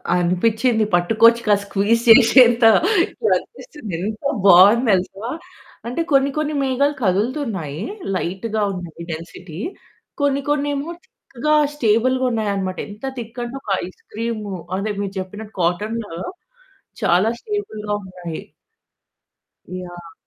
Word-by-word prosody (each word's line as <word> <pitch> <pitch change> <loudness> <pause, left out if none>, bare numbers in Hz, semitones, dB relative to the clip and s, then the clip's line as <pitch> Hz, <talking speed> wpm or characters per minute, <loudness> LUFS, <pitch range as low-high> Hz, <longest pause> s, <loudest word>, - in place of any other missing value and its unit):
అనిపిచ్చింది. 220 +6 +1
పట్టుకోవచ్చు 225 +6 +4
కదా! 205 -1 +5
స్క్వీజ్ 205 +3 +1
చేసేంత 240 +1 +7 0.7
అనిపిస్తుంది. 300 - -7
ఎంత 215 +6 -4 0.2
బావుంది 200 +6 +7
తెలుసా! 195 +4 -1 0.6
అంటే 250 +8 -2
కొన్ని 275 0 +4
కొన్ని 305 0 -1
మేఘాలు 275 +2 +1
కదులుతున్నాయి. 200 - -1 0.3
లైట్‌గా 205 +5 -2
ఉన్నాయి 170 -2 -8
డెన్సిటీ. 165 +1 -8 0.6
కొన్ని 280 -1 +1
కొన్నేమో 290 +1 -1 0.2
థిక్‌గా 300 +4 -2 0.2
స్టేబుల్‌గా 255 +1 +2
ఉన్నాయనమాట. 200 -4 -2
ఎంత 210 +5 -9
థిక్ 235 0 -7
అంటే 240 +2 -6
ఒక 220 - -11 0.2
ఐస్ 185 - -13
క్రీమ్ 225 0 -3 0.3
అదే 205 +2 -2
మీరు 200 -1 -4
చెప్పినట్టు 205 +3 -8
కాటను 205 +5 -1 0.9
చాలా 185 +6 +3
స్టేబుల్‌గా 215 - -4
ఉన్నాయి. 180 -3 -7 1.4
యాహ్! 175 -2 -11
215 Hz, 105 wpm, -20 LUFS, 185-245 Hz, 1.4 s, చేసేంత